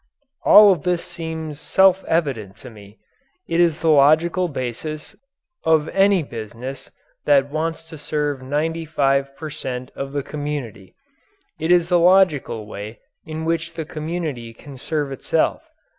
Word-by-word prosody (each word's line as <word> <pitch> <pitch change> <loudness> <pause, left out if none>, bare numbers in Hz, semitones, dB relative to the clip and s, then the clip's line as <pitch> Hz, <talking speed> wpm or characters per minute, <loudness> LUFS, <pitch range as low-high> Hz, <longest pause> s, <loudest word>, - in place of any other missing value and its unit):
All 210 -1 +9
of 175 -6 0
this 175 +2 -1
seems 160 -3 -6
self 190 +1 +3
evident 130 - -1
to 125 - -9
me. 105 -1 -15 0.5
It 165 - 0
is 170 -2 +2
the 165 - +2
logical 155 +5 +4
basis 150 +2 -6 0.5
of 160 -1 +2
any 195 -2 +3
business 120 +2 -8 0.4
that 140 -1 +3
wants 160 +1 -2
to 160 -1 -11
serve 145 -2 -2
95 145 -1 -1
per 155 -1 -7
cent. 125 -2 -6
of 135 0 -5
the 140 -1 -2
community. 145 -11 -6 0.6
It 160 +2 0
is 175 -1 +4
the 175 -1 +4
logical 170 - +3
way 105 +1 -8 0.3
in 160 0 -5
which 165 0 -2
the 160 - -4
community 155 -7 -5
can 140 +2 -12
serve 145 0 -2
itself. 135 - -1
150 Hz, 145 wpm, -21 LUFS, 135-165 Hz, 0.6 s, All